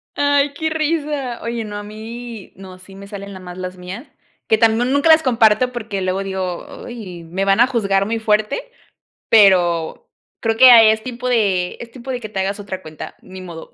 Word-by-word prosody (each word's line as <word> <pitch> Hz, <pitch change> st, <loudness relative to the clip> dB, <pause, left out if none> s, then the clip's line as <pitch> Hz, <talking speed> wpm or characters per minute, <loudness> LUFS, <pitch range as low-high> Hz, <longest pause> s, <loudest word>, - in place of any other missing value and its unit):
Ay, 285 Hz, 0 st, +2 dB
qué 315 Hz, +2 st, -2 dB
risa. 300 Hz, -5 st, -2 dB
Oye, 230 Hz, 0 st, -3 dB
no, 210 Hz, -1 st, -6 dB
a 205 Hz, -, -6 dB
mí 220 Hz, +1 st, -9 dB
no, 185 Hz, -1 st, -12 dB
sí 190 Hz, +1 st, -15 dB
me 200 Hz, 0 st, -11 dB
salen 200 Hz, 0 st, -8 dB
nada 190 Hz, -1 st, -10 dB
más 180 Hz, 0 st, -9 dB
las 185 Hz, 0 st, -6 dB
mías, 185 Hz, +8 st, -8 dB, 0.4 s
que 220 Hz, -, +3 dB
también 225 Hz, +2 st, +2 dB
nunca 285 Hz, +4 st, +2 dB
las 320 Hz, 0 st, +7 dB
comparto 235 Hz, -1 st, +3 dB
porque 215 Hz, -5 st, -5 dB
luego 185 Hz, +1 st, -1 dB
digo: 190 Hz, -2 st, -5 dB
"Ay, 195 Hz, -8 st, -8 dB
me 180 Hz, +4 st, -3 dB
van 195 Hz, +2 st, +3 dB
a 240 Hz, -, +6 dB
juzgar 200 Hz, -6 st, +1 dB
muy 225 Hz, +2 st, -2 dB
fuerte", 215 Hz, -, 0 dB, 0.7 s
pero 175 Hz, -6 st, +3 dB, 0.3 s
creo 225 Hz, -1 st, 0 dB
que, 255 Hz, +2 st, +9 dB
ah, 235 Hz, -2 st, +9 dB
es 220 Hz, 0 st, +4 dB
tipo 250 Hz, 0 st, -5 dB
de 195 Hz, -7 st, +1 dB
es 235 Hz, -, -9 dB
tipo 255 Hz, +2 st, -9 dB
de 250 Hz, -1 st, -3 dB
que 215 Hz, -, -7 dB
te 200 Hz, -2 st, -4 dB
hagas 195 Hz, +2 st, -2 dB
otra 190 Hz, -2 st, -7 dB
cuenta, 155 Hz, -2 st, -9 dB
ni 185 Hz, 0 st, -11 dB
modo. 170 Hz, -3 st, -10 dB
215 Hz, 205 wpm, -19 LUFS, 190-245 Hz, 0.7 s, que